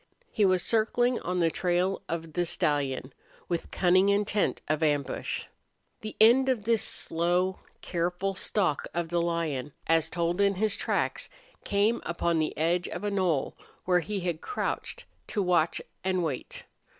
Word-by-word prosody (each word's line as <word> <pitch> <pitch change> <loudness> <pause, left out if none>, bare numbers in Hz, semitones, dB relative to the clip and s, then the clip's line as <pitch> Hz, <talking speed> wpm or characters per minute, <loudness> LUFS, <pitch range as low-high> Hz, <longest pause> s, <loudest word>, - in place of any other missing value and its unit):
He 210 - +2
was 185 -2 +3
circling 240 +2 +2
on 180 +1 -2
the 165 -1 +3
trail 180 +2 0
of 165 -1 -4
the 175 - +1
stallion, 140 -5 -1 0.3
with 170 -2 -3
cunning 185 +2 +3
intent 205 0 +1
of 155 +1 0
ambush. 145 -3 -1 0.5
The 215 -1 -7
end 245 +5 +6
of 245 -5 0
this 230 0 +2
slow, 175 +3 +1 0.2
careful 180 +3 -1
stalk 185 -5 0
of 170 -1 -1
the 170 0 +1
lion, 160 -6 -2
as 165 -1 +2
told 170 +2 0
in 200 0 +3
his 210 +1 0
tracks, - - -1 0.3
came 205 +3 +1
upon 170 -1 0
the 155 - -1
edge 170 +3 +1
of - - -6
a 205 - -1
knoll 180 -8 0 0.3
where 180 -1 +4
he 200 +3 -3
had 175 -3 -2
crouched 485 +3 -3 0.2
to 205 - -1
watch 175 -3 +2 0.2
and 185 -1 0
wait. 145 -6 -4
180 Hz, 155 wpm, -28 LUFS, 165-200 Hz, 0.5 s, end